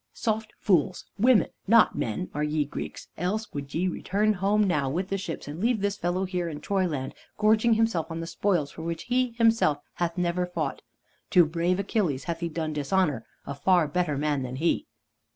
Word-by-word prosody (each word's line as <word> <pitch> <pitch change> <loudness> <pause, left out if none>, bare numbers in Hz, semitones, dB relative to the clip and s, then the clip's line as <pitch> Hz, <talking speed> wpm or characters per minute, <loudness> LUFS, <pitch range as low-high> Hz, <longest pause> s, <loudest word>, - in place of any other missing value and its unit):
Soft 220 -1 -2
fools, 180 -1 +1
women, 240 0 +5 0.2
not 230 +2 +5
men, 115 +12 -3
are 150 - -1
ye 150 0 0
Greeks, 140 - -7
else 210 +5 -2
would 140 -1 -5
ye 180 +3 +1
return 205 +4 +1
home 205 +2 +2
now 150 -9 +1
with 180 +7 -2
the 195 - 0
ships, 170 -6 -5
and 150 +3 -6
leave 235 0 +2
this 200 0 0
fellow 180 0 -1
here 180 -2 -2
in 150 -2 -6
Troyland 170 -10 -1 0.2
gorging 220 +2 +4
himself 215 -8 +1
on 165 0 -4
the 165 - -4
spoils 170 -3 0
for - - -9
which 165 0 -4
he 250 -1 0
himself 225 -10 +3 0.2
hath 170 0 -2
never 180 0 0
fought. 180 - -3 0.5
To 180 -3 +6
brave 170 +3 0
Achilles 180 - 0
hath 165 +2 -3
he 170 -1 -2
done 155 -1 -3
dishonor, 150 -3 0 0.2
a 140 - -4
far 175 +3 +3
better 150 -2 0
man 145 -1 0
than 130 0 -4
he!" 165 +5 0
175 Hz, 190 wpm, -27 LUFS, 155-205 Hz, 0.5 s, To